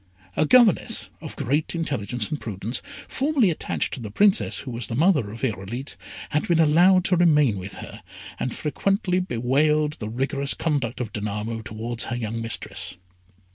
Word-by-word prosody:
A 155 - +2
governess 235 0 +4
of 155 - -8
great 145 +5 -1
intelligence 125 -8 -1
and 150 - -3
prudence, 110 +3 -3 0.3
formerly 270 - +2
attached 155 - -2
to - - -3
the 110 -3 -6
Princess 200 - +3
who 130 - -7
was 115 -2 -3
the 115 - -4
mother 150 - +3
of 115 +5 -9
Irolite, 115 +3 -3 0.4
had 150 - 0
been 170 -2 +3
allowed 175 +4 +5
to 185 - +3
remain 150 - +4
with 95 +2 -7
her, - - -9 0.4
and 130 - -1
frequently 185 +4 0
bewailed 150 +1 +1
the 105 - -4
rigorous 135 +4 -1
conduct 135 -7 -1
of 110 -4 -5
Danamo 105 +2 -3
towards 115 +2 -4
her 120 - -3
young 115 -1 -3
mistress. 115 -1 -3
135 Hz, 165 wpm, -24 LUFS, 115-165 Hz, 0.4 s, allowed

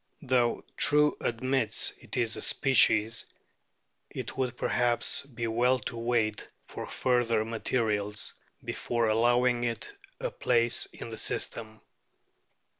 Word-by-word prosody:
Though 125 -3 +1
True 150 0 +4
admits 130 +3 +1
it - - -7
is 115 -2 +1
a - - -4
species, 115 -4 +3 0.8
it - - -6
would 125 -2 -2
perhaps 120 -1 +1
be 120 -3 -5
well 120 +3 +2
to 115 0 -6
wait 115 -2 -1 0.2
for - - -7
further 120 -4 +1
materials 110 -2 -2 0.3
before 120 -2 -1
allowing 120 +2 +2
it 120 - -3 0.3
a - - -3
place 120 0 +1
in - - -9
the 110 -1 -7
system. 110 -1 -3
120 Hz, 115 wpm, -29 LUFS, 115-125 Hz, 0.8 s, True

